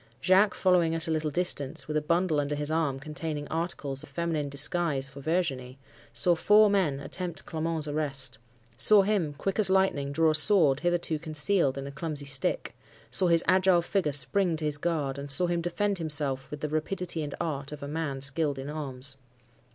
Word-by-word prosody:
Jacques, 195 Hz, +3 st, +3 dB
following 175 Hz, -3 st, +2 dB
at 165 Hz, +1 st, 0 dB
a -, -, -1 dB
little 155 Hz, -1 st, -1 dB
distance, 145 Hz, -4 st, -2 dB
with 155 Hz, -, -4 dB
a 155 Hz, -, +1 dB
bundle 170 Hz, 0 st, +1 dB
under 145 Hz, 0 st, -2 dB
his 145 Hz, +1 st, -3 dB
arm 155 Hz, -4 st, -1 dB
containing 150 Hz, 0 st, -5 dB
articles 160 Hz, -5 st, -3 dB
of -, -, -9 dB
feminine 155 Hz, -1 st, -2 dB
disguise 140 Hz, 0 st, 0 dB
for 135 Hz, +1 st, -12 dB
Virginie, 135 Hz, -5 st, -2 dB, 0.3 s
saw 120 Hz, +10 st, +5 dB
four 210 Hz, +5 st, +4 dB
men 170 Hz, -9 st, +1 dB
attempt 170 Hz, +5 st, -6 dB
Clement's 160 Hz, -1 st, -3 dB
arrest—saw 135 Hz, -, +1 dB
him, 190 Hz, -8 st, -1 dB
quick 195 Hz, +6 st, -3 dB
as 205 Hz, -3 st, +6 dB
lightning, 190 Hz, -8 st, +1 dB
draw 160 Hz, +2 st, +2 dB
a -, -, 0 dB
sword 155 Hz, -4 st, +5 dB
hitherto 170 Hz, -1 st, -1 dB
concealed 155 Hz, -2 st, 0 dB
in 135 Hz, -, -5 dB
a 140 Hz, -, -7 dB
clumsy 150 Hz, -1 st, -3 dB
stick—saw 140 Hz, +6 st, 0 dB
his 170 Hz, -1 st, +4 dB
agile 185 Hz, -2 st, +4 dB
figure 180 Hz, -4 st, -1 dB
spring 160 Hz, +6 st, +1 dB
to 155 Hz, -1 st, 0 dB
his 145 Hz, -1 st, +1 dB
guard,—and 145 Hz, -4 st, -3 dB
saw 140 Hz, +6 st, +3 dB
him 175 Hz, -1 st, -1 dB
defend 195 Hz, +3 st, -1 dB
himself 145 Hz, -4 st, -2 dB
with 150 Hz, -, -8 dB
the 150 Hz, -, -2 dB
rapidity 165 Hz, +2 st, -2 dB
and 145 Hz, -2 st, -5 dB
art 140 Hz, -3 st, -4 dB
of 150 Hz, -1 st, -8 dB
a -, -, -5 dB
man 145 Hz, -3 st, -4 dB
skilled 140 Hz, +1 st, -1 dB
in 135 Hz, +2 st, -6 dB
arms. 135 Hz, -3 st, -5 dB
155 Hz, 180 wpm, -27 LUFS, 140-175 Hz, 0.3 s, as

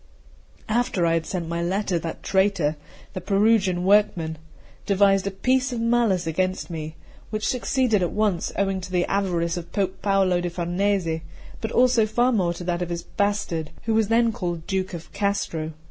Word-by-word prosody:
After 230 Hz, -5 st, +1 dB
I 165 Hz, -, +2 dB
had 165 Hz, -1 st, -1 dB
sent 175 Hz, -3 st, -3 dB
my 170 Hz, +1 st, -2 dB
letter, 185 Hz, 0 st, 0 dB
that 165 Hz, 0 st, -6 dB
traitor, 190 Hz, -6 st, +2 dB, 0.4 s
the 185 Hz, -, -4 dB
Perugian 195 Hz, -2 st, +2 dB
workman, 185 Hz, -6 st, +2 dB, 0.5 s
devised 195 Hz, -1 st, +3 dB
a -, -, +2 dB
piece 255 Hz, +6 st, +1 dB
of 240 Hz, -, -3 dB
malice 230 Hz, -6 st, +2 dB
against 185 Hz, +3 st, -1 dB
me, 155 Hz, -1 st, -5 dB, 0.3 s
which 215 Hz, 0 st, -2 dB
succeeded 250 Hz, -4 st, +1 dB
at 175 Hz, -, +1 dB
once, 205 Hz, -5 st, 0 dB
owing 195 Hz, -1 st, 0 dB
to 185 Hz, 0 st, -8 dB
the 180 Hz, -1 st, +2 dB
avarice 180 Hz, -4 st, 0 dB
of 170 Hz, -1 st, -7 dB
Pope 190 Hz, -2 st, -2 dB
Paolo 195 Hz, -3 st, +2 dB
da 175 Hz, -, -2 dB
Farnese, 175 Hz, -1 st, -1 dB, 0.4 s
but 220 Hz, -, -3 dB
also 245 Hz, -3 st, +4 dB
far 240 Hz, +4 st, +2 dB
more 180 Hz, -7 st, +1 dB
to 175 Hz, -, -7 dB
that 175 Hz, 0 st, -1 dB
of 175 Hz, -, -2 dB
his 170 Hz, -1 st, -4 dB
bastard, 200 Hz, -6 st, -1 dB
who 225 Hz, -, 0 dB
was 220 Hz, -1 st, +3 dB
then 230 Hz, +1 st, +3 dB
called 175 Hz, -7 st, -4 dB
Duke 190 Hz, -1 st, -2 dB
of 165 Hz, -, -10 dB
Castro. 200 Hz, -6 st, -1 dB
190 Hz, 175 wpm, -24 LUFS, 170-210 Hz, 0.5 s, also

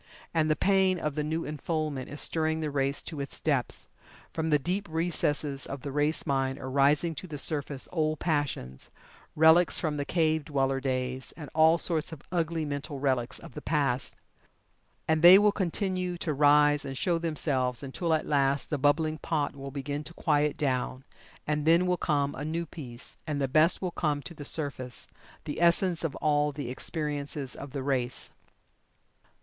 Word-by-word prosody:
And 155 Hz, -2 st, +2 dB
the 155 Hz, -, +3 dB
pain 190 Hz, 0 st, +3 dB
of 150 Hz, -3 st, -2 dB
the 150 Hz, +1 st, -2 dB
new 160 Hz, +2 st, -2 dB
unfoldment 150 Hz, -2 st, -3 dB
is 145 Hz, -, -5 dB
stirring 160 Hz, -1 st, +2 dB
the 155 Hz, -2 st, -2 dB
race 140 Hz, 0 st, 0 dB
to 150 Hz, -4 st, -5 dB
its 140 Hz, -, -5 dB
depths. 140 Hz, -6 st, -1 dB, 0.5 s
From 160 Hz, 0 st, -1 dB
the 150 Hz, -, +5 dB
deep 180 Hz, +6 st, -3 dB
recesses 155 Hz, -4 st, -1 dB
of 140 Hz, -1 st, -6 dB
the 140 Hz, -, -5 dB
race 150 Hz, +3 st, 0 dB
mind 135 Hz, -2 st, 0 dB
are 130 Hz, -2 st, -6 dB
rising 145 Hz, +4 st, +3 dB
to 170 Hz, +5 st, -7 dB
the 150 Hz, -3 st, -6 dB
surface 145 Hz, -2 st, -1 dB
old 155 Hz, -2 st, 0 dB
passions, 145 Hz, -, -2 dB, 0.5 s
relics 160 Hz, +3 st, +5 dB
from 155 Hz, -3 st, -1 dB
the 145 Hz, -, -1 dB
cave 160 Hz, -1 st, +1 dB
dweller 135 Hz, -2 st, 0 dB
days, 130 Hz, -1 st, -3 dB
and 150 Hz, -4 st, -9 dB
all 160 Hz, +1 st, +5 dB
sorts 165 Hz, -2 st, +1 dB
of 155 Hz, -3 st, -9 dB
ugly 165 Hz, -2 st, -1 dB
mental 145 Hz, 0 st, -4 dB
relics 130 Hz, -3 st, 0 dB
of -, -, -12 dB
the -, -, -7 dB
past. 140 Hz, -5 st, -1 dB, 0.9 s
And 160 Hz, -1 st, +2 dB
they 175 Hz, +3 st, +10 dB
will 205 Hz, +1 st, +5 dB
continue 185 Hz, -2 st, -2 dB
to 160 Hz, -2 st, -2 dB
rise 145 Hz, +1 st, +4 dB
and 135 Hz, -1 st, -6 dB
show 170 Hz, +2 st, +1 dB
themselves 140 Hz, -6 st, -1 dB
until 160 Hz, +5 st, -2 dB
at 155 Hz, -, -2 dB
last 140 Hz, 0 st, +1 dB
the 150 Hz, -, 0 dB
bubbling 155 Hz, +3 st, +2 dB
pot 150 Hz, -3 st, -1 dB
will 140 Hz, 0 st, -7 dB
begin 145 Hz, +2 st, -4 dB
to 170 Hz, -, -8 dB
quiet 150 Hz, -2 st, +1 dB
down, 130 Hz, -2 st, -1 dB, 0.4 s
and 150 Hz, 0 st, -1 dB
then 170 Hz, +2 st, +5 dB
will 180 Hz, 0 st, +2 dB
come 145 Hz, -4 st, 0 dB
a 145 Hz, -, -6 dB
new 165 Hz, +3 st, -2 dB
peace, 125 Hz, -7 st, -9 dB
and 150 Hz, -2 st, -2 dB
the 135 Hz, -, +1 dB
best 155 Hz, +8 st, +3 dB
will 180 Hz, -, -1 dB
come 150 Hz, -4 st, -1 dB
to 170 Hz, -, -8 dB
the 150 Hz, -3 st, -9 dB
surface 135 Hz, -5 st, -2 dB, 0.4 s
the 150 Hz, -, -5 dB
essence 170 Hz, 0 st, +3 dB
of 160 Hz, -4 st, -2 dB
all 150 Hz, -1 st, +1 dB
the 140 Hz, -3 st, -5 dB
experiences 145 Hz, -1 st, -3 dB
of 140 Hz, -, -8 dB
the 135 Hz, 0 st, -5 dB
race. 130 Hz, -2 st, -2 dB
150 Hz, 180 wpm, -28 LUFS, 140-160 Hz, 0.9 s, they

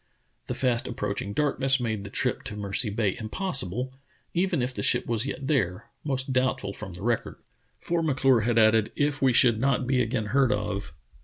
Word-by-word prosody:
The -, -, -3 dB
fast 125 Hz, -3 st, 0 dB
approaching 110 Hz, -5 st, -3 dB
darkness 135 Hz, +1 st, +2 dB
made 110 Hz, -4 st, -2 dB
the 105 Hz, -, -7 dB
trip -, -, -1 dB
to 105 Hz, -, -5 dB
Mercy 105 Hz, +3 st, 0 dB
Bay 105 Hz, 0 st, 0 dB
im 110 Hz, -, -6 dB
possible, 130 Hz, -, -2 dB, 0.4 s
even 175 Hz, -7 st, +1 dB
if 125 Hz, +1 st, -2 dB
the -, -, -4 dB
ship -, -, +2 dB
was 115 Hz, +2 st, -1 dB
yet 140 Hz, 0 st, -5 dB
there 110 Hz, -, -1 dB
— -, -, -46 dB
most 135 Hz, -2 st, -1 dB
doubtful 130 Hz, -6 st, 0 dB
from 100 Hz, -3 st, -8 dB
the 90 Hz, -, -8 dB
record. 120 Hz, -1 st, -1 dB, 0.4 s
For 170 Hz, -1 st, -1 dB
M'Clure 135 Hz, -5 st, +3 dB
had 115 Hz, +1 st, 0 dB
added: 110 Hz, -1 st, +4 dB
"If 145 Hz, -1 st, 0 dB
we 135 Hz, -1 st, +4 dB
should 115 Hz, -2 st, +5 dB
not 135 Hz, 0 st, +1 dB
be 130 Hz, 0 st, +2 dB
again 115 Hz, -2 st, -1 dB
heard 135 Hz, -3 st, +4 dB
of 100 Hz, -5 st, -2 dB
125 Hz, 200 wpm, -26 LUFS, 105-135 Hz, 0.4 s, should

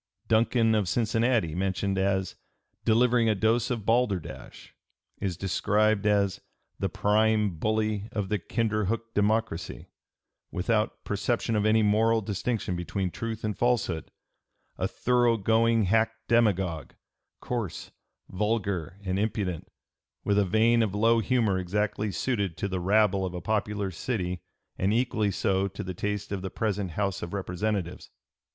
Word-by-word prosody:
299) 115 Hz, +2 st, +3 dB
Duncan, 110 Hz, -, +3 dB
of 95 Hz, -4 st, -1 dB
Cincinnati, 115 Hz, -4 st, +1 dB
mentioned 95 Hz, +2 st, -1 dB
as 95 Hz, -1 st, 0 dB, 0.5 s
"delivering 115 Hz, 0 st, +4 dB
a 110 Hz, -, +2 dB
dose 115 Hz, +4 st, +1 dB
of 115 Hz, -5 st, -3 dB
balderdash," 115 Hz, -8 st, -1 dB, 0.5 s
is 95 Hz, -4 st, -2 dB
described 105 Hz, +3 st, +1 dB
as 100 Hz, -1 st, +2 dB, 0.4 s
"the -, -, 0 dB
prime 105 Hz, -3 st, +2 dB
bully 110 Hz, 0 st, 0 dB
of 105 Hz, -3 st, -2 dB
the 105 Hz, -, 0 dB
Kinderhook 115 Hz, +2 st, -1 dB
Democracy," 105 Hz, -4 st, -1 dB, 0.6 s
without 105 Hz, +4 st, -1 dB
"perception 110 Hz, +3 st, -1 dB
of 105 Hz, 0 st, +2 dB
any 110 Hz, 0 st, +4 dB
moral 110 Hz, +2 st, +3 dB
distinction 100 Hz, -1 st, -2 dB
between 90 Hz, +2 st, -2 dB
truth 115 Hz, +1 st, -5 dB
and 105 Hz, -1 st, -1 dB
falsehood,... 120 Hz, -9 st, 0 dB, 0.7 s
a -, -, -1 dB
thorough 120 Hz, -2 st, +2 dB
going 115 Hz, +2 st, +3 dB
hack 110 Hz, +3 st, +2 dB, 0.2 s
demagogue, 95 Hz, -, +1 dB, 0.5 s
coarse, 115 Hz, -8 st, -4 dB, 0.4 s
vulgar, 100 Hz, -3 st, -2 dB
and 95 Hz, 0 st, -1 dB
impudent, 100 Hz, -5 st, -2 dB, 0.6 s
with 100 Hz, 0 st, +2 dB
a -, -, +4 dB
vein 115 Hz, +4 st, +3 dB
of 105 Hz, -3 st, 0 dB
low 115 Hz, +2 st, +4 dB
humor 110 Hz, -3 st, +1 dB
exactly 105 Hz, +3 st, -1 dB
suited 100 Hz, -8 st, -1 dB
to 100 Hz, -, -2 dB
the 95 Hz, -1 st, -2 dB
rabble 100 Hz, +1 st, +3 dB
of 90 Hz, -1 st, -3 dB
a -, -, -3 dB
popular 105 Hz, 0 st, -1 dB
city 90 Hz, -2 st, -3 dB, 0.4 s
and 95 Hz, +3 st, +2 dB
equally 115 Hz, -4 st, +1 dB
so 95 Hz, 0 st, +1 dB
to 95 Hz, 0 st, -7 dB
the 95 Hz, -, -5 dB
taste 105 Hz, +3 st, -3 dB
of 100 Hz, -2 st, -2 dB
the 95 Hz, -, -4 dB
present 100 Hz, -4 st, -2 dB
House 100 Hz, 0 st, -1 dB
of 85 Hz, +3 st, -5 dB
Representatives." 95 Hz, -1 st, -3 dB
105 Hz, 140 wpm, -27 LUFS, 95-110 Hz, 0.7 s, delivering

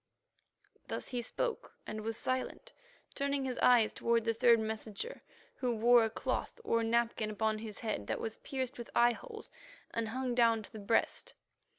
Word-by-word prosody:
Thus -, -, -4 dB
he 245 Hz, -2 st, -2 dB
spoke 465 Hz, -, -3 dB
and 215 Hz, 0 st, -5 dB
was 225 Hz, +1 st, -3 dB
silent, 260 Hz, -, -3 dB, 0.4 s
turning 280 Hz, -1 st, -1 dB
his 255 Hz, -2 st, -3 dB
eyes 240 Hz, -3 st, +5 dB
toward 230 Hz, -1 st, +1 dB
the 230 Hz, -, +2 dB
third 230 Hz, +1 st, +5 dB
messenger, 220 Hz, -, -4 dB
he -, -, -31 dB, 0.3 s
who 245 Hz, -2 st, 0 dB
wore 235 Hz, +1 st, +6 dB
a 225 Hz, -, +1 dB
cloth 225 Hz, -, -3 dB
or 230 Hz, -, +2 dB
napkin 230 Hz, -1 st, +1 dB
upon 215 Hz, 0 st, 0 dB
his 215 Hz, -1 st, -6 dB
head 215 Hz, -, -3 dB
that -, -, -1 dB
was 225 Hz, 0 st, -4 dB
pierced 260 Hz, -3 st, -4 dB
with 235 Hz, -, -7 dB
eyeholes 435 Hz, -, +1 dB, 0.4 s
and 230 Hz, -1 st, -1 dB
hung 255 Hz, +1 st, -2 dB
down 230 Hz, -2 st, +4 dB
to -, -, -13 dB
the 220 Hz, -, -8 dB
breast. 205 Hz, +3 st, 0 dB
230 Hz, 175 wpm, -33 LUFS, 220-255 Hz, 0.4 s, wore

